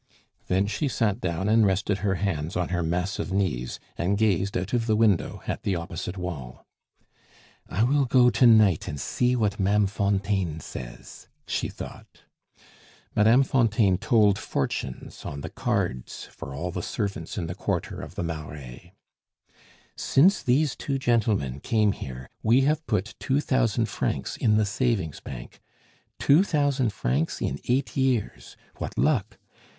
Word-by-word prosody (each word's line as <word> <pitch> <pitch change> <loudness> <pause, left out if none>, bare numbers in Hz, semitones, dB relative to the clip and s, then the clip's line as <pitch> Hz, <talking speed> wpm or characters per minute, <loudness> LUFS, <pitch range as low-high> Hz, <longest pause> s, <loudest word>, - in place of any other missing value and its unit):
Then 95 +2 +2
she 105 +8 -1
sat 115 -3 0
down 85 +2 -1
and 110 +1 +5
rested 100 0 +1
her 100 -2 0
hands 85 -4 -2
on 90 -2 -1
her 90 -1 0
massive 90 +4 -2
knees, 90 -11 -1 0.2
and 95 +4 +1
gazed 100 -3 +1
out 95 +4 -4
of 120 -1 +1
the 110 - +3
window 105 -5 +1
at - - -3
the 95 - 0
opposite 85 +2 -5
wall. 75 -9 -6 1.0
"I 100 +6 +1
will 140 +3 +3
go 125 0 +5
to 125 - +5
night 110 -7 +5
and 75 - -4
see 125 - +1
what 105 -4 0
Ma'am 100 +2 +3
Fontaine 100 -4 0
says," - - -9 0.2
she - - -2
thought. - - -10 0.9
(Madame 115 +5 +5
Fontaine 110 -8 +2
told 105 -6 +3
fortunes 65 -2 -4
on 70 - -6
the - - -6
cards 65 -1 -2
for 70 - -8
all 90 +5 -3
the 90 - -3
servants 100 -4 -4
in 90 - -2
the 85 - -4
quarter - - -3
of - - -9
the - - -2
Marais.) 75 -6 -7 1.0
"Since 180 +9 +4
these 135 +3 +2
two 135 -1 -2
gentlemen 110 - +1
came 105 +4 +2
here, 65 -6 -7
we 120 +4 +4
have 150 +3 +1
put 105 -1 -1
two 135 +2 +1
thousand 125 -5 +1
francs 100 - -2
in 105 -2 +2
the 110 - +3
savings 105 - -1
bank. - - -9 0.6
Two 150 +7 +5
thousand 145 - +1
francs 75 -5 -1
in 70 - -2
eight 130 +3 0
years! 130 -5 -1 0.2
What - - -5
luck! 110 -9 +1
100 Hz, 155 wpm, -26 LUFS, 85-120 Hz, 1.0 s, and